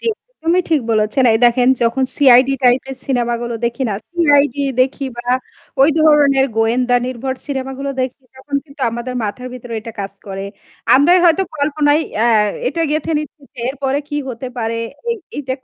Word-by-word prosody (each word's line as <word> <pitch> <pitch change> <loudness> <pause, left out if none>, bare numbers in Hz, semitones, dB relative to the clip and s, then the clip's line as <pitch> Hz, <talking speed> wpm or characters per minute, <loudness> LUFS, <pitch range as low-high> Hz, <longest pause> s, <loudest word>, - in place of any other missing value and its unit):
জি, - - -13 0.3
একদমই 355 -6 0
ঠিক 310 -3 +3
বলেছেন 215 +4 +2
এই 220 - +2
দেখেন 245 +1 +4
যখন 235 +3 +1
সিআইডি 260 -1 +6
টাইপের 255 +2 +2
সিনেমাগুলো 240 -2 -1
দেখি 235 +2 -2
না 205 - -2 0.2
সিআইডি 290 -5 +3 0.2
দেখি 270 +2 0
বা 240 0 -8 0.6
ওই 280 - +6
ধরনের 285 -3 +4
গোয়েন্দা 245 +2 +2
নির্ভর 255 +1 -3
সিনেমাগুলো 270 0 -4
দেখি 255 +1 -4
তখন 270 +2 -9
কিন্তু 280 -1 -17
আমাদের 240 +2 -5
মাথার 250 +5 -5
ভিতরে 245 -1 -9
এটা 225 +1 -9
কাজ 195 0 -5
করে। 195 0 -5 0.5
আমরাই 330 +7 +5
হয়তো 345 +2 +4
কল্পনায় 290 +1 +2 0.2
আ - - +4 0.4
এটা 330 +7 -1
গেঁথে 310 +2 -1
নিচ্ছি 300 0 -8
যে - - -17
এরপরে 270 0 -1
কী 295 - -3
হতে 250 +1 -6
পারে, 225 0 -2 0.3
এই 465 - -1 0.2
এইটা 265 -3 -3
265 Hz, 165 wpm, -17 LUFS, 240-290 Hz, 0.6 s, সিআইডি